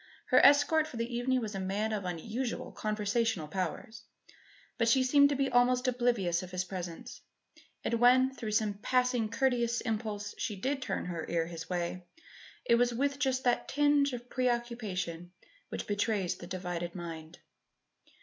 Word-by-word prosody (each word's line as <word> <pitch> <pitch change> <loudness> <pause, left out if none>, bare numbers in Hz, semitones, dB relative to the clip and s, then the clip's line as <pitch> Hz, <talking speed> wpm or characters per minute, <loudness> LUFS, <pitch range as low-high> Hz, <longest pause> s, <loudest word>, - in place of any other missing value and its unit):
Her - - +6
escort 290 +2 +5
for 255 - -9
the 230 +1 -3
evening 255 +1 +1
was 215 -2 -4
a 195 - -3
man 200 +3 -1
of 200 -3 -3
unusual 220 +8 -4
conversational 215 -4 -1
powers; 195 +7 -4 0.8
but 230 - +2
she 255 +3 +4
seemed 285 +2 +5
to 285 - 0
be 275 0 0
almost 250 +1 +3
oblivious 240 -9 +1
of 185 - -8
his 180 0 -2
presence; 190 +7 -7 0.6
and - - -1
when, 250 +3 +5
through 225 -5 -5
some 210 -2 0
passing 250 -2 +1
courteous 240 -1 +1
impulse, 215 -3 -3
she 220 -5 -2
did 265 +7 -2
turn - - -3
her 170 -2 -4
ear 165 -1 +1
his 165 -1 -8
way, 175 0 -3 0.6
it - - +3
was 245 0 +3
with 280 +2 0
just 265 -2 0
that 245 -1 +1
tinge 290 0 +3
of 245 -1 -7
preoccupation 220 -9 -2 0.4
which - - -4
betrays 205 -2 0
the 175 - -10
divided 175 -2 -4
mind. 165 -3 -7
225 Hz, 160 wpm, -31 LUFS, 185-250 Hz, 0.8 s, Her